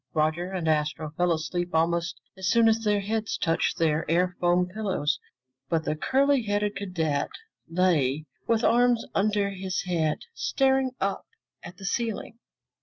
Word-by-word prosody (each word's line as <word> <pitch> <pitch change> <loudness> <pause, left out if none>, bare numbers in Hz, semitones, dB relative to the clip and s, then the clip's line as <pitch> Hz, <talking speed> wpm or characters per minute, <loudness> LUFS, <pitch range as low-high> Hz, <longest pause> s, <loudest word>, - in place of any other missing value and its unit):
Roger 160 +3 +1
and 180 -4 -3
Astro 150 0 0
fell 175 +3 +1
asleep 175 +2 -2
almost 170 +1 +1 0.2
as 190 -1 -4
soon 230 +4 +5
as 225 0 +4
their 210 -1 +2
heads 220 +2 -2
touched 165 -1 0
their 160 -1 +2
air 180 +2 +2
foam 175 0 +3
pillows, 190 -6 -1 0.5
but 165 -1 +1
the 155 - 0
curly 275 - +2
haired 205 -1 -1
cadet 160 -7 -1 0.4
lay 155 -5 +2 0.2
with 230 0 +2
arms 240 -1 +3
under 205 0 +1
his 190 -1 -3
head, 165 -4 0 0.2
staring 265 - +2
up 195 0 -2 0.3
at 180 - -10
the 195 - -9
ceiling. 230 +2 -2
180 Hz, 150 wpm, -27 LUFS, 165-210 Hz, 0.5 s, soon